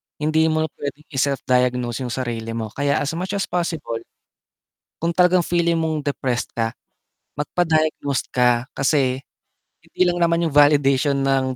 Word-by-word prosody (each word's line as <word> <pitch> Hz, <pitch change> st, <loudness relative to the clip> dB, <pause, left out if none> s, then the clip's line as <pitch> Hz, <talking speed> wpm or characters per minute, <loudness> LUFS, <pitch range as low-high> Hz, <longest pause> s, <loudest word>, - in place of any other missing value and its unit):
hindi 155 Hz, +1 st, +2 dB
mo 155 Hz, -1 st, 0 dB
puwedeng 145 Hz, +1 st, -6 dB
i-self 140 Hz, 0 st, 0 dB
diagnose 125 Hz, -1 st, +1 dB
yung 120 Hz, -, -4 dB
sarili 115 Hz, -3 st, -4 dB
mo, 110 Hz, -2 st, -4 dB
kaya 140 Hz, +2 st, 0 dB
as 145 Hz, -, -1 dB
much 185 Hz, +4 st, -3 dB
as 200 Hz, -, 0 dB
possible, 165 Hz, -9 st, -3 dB, 1.0 s
kung 165 Hz, +1 st, -1 dB
talagang 180 Hz, +1 st, +4 dB
feeling 170 Hz, 0 st, +1 dB
mong 160 Hz, -1 st, -1 dB
depressed 135 Hz, -4 st, -2 dB
ka, 115 Hz, -1 st, 0 dB, 0.7 s
magpa 165 Hz, +4 st, -1 dB
diagnose 155 Hz, -3 st, +1 dB
ka, 125 Hz, -2 st, +3 dB
kasi, 135 Hz, -2 st, +1 dB, 0.6 s
hindi -, -, -7 dB
lang 175 Hz, -1 st, +1 dB
naman 170 Hz, 0 st, +2 dB
yung 165 Hz, -, 0 dB
validation 145 Hz, -1 st, +4 dB
ng 135 Hz, -1 st, +1 dB
145 Hz, 150 wpm, -21 LUFS, 130-165 Hz, 1.0 s, talagang